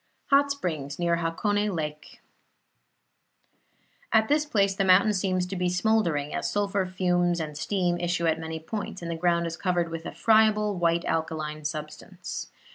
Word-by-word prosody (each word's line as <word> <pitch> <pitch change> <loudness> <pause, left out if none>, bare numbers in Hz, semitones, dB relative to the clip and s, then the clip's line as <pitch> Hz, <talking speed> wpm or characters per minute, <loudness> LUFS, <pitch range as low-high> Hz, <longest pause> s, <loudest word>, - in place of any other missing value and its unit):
HOT 280 +1 +5
SPRINGS 155 - -4
NEAR 170 -1 +1
HAKONE 205 +5 0
LAKE 150 -1 -6 1.9
At 220 -1 +3
this 300 +1 +2
place 200 -7 +2
the 195 - 0
mountain 195 +3 +5
seems 185 -2 0
to 185 +2 -5
be 180 -1 0
smouldering, 180 -6 +1
as - - -1
sulphur 200 -2 0
fumes 175 -1 +1
and 155 -2 -4
steam 175 +1 0
issue 175 0 -1
at 160 0 +1
many 160 0 -5
points, 190 +2 -6
and 170 - -4
the - - -2
ground 170 0 +1
is 165 0 -3
covered 175 -3 0
with 165 0 -6
a - - -5
friable 215 -1 +3
white 170 -1 +1
alkaline 155 -1 -2
substance. 150 0 -6
175 Hz, 160 wpm, -26 LUFS, 165-200 Hz, 1.9 s, HOT